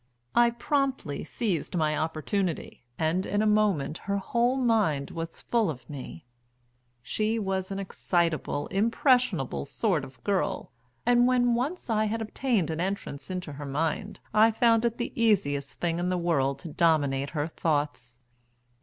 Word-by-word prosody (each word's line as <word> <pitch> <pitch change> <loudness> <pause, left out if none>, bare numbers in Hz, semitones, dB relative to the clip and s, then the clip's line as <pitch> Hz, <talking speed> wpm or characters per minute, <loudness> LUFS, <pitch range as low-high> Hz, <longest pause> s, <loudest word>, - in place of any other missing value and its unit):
I 240 0 +5
promptly 265 - -1
seized 185 -2 -2
my 155 -2 +1
opportunity, 160 - -2
and 165 +4 +1
in 205 +2 0
a - - +2
moment 200 -9 +2
her 200 - +2
whole 235 +6 +1
mind 215 - +1
was 165 0 -6
full 230 -6 +1
of 130 -5 -7
me. 130 - -8 0.8
She 215 - 0
was 190 -3 -2
an 195 - -4
excitable, 170 -6 -1
impressionable 225 - +2
sort 175 - 0
of 130 0 -12
girl, 200 -2 -1 0.3
and 245 0 +5
when 245 -1 +3
once 275 +10 -2
I 215 -2 +2
had 220 +2 -1
obtained 220 - 0
an 160 +1 -2
entrance 190 -6 -4
into 180 -5 -4
her 145 +1 -7
mind 160 +8 -2
I 220 +1 +6
found 230 0 +3
it 235 0 0
the 240 - -3
easiest 175 -12 +1
thing 170 -1 0
in 180 +1 0
the 185 - +1
world 140 -6 +1
to - - -3
dominate 145 -4 +2
her 145 - +1
thoughts. 145 -6 -2
185 Hz, 155 wpm, -28 LUFS, 155-225 Hz, 0.8 s, I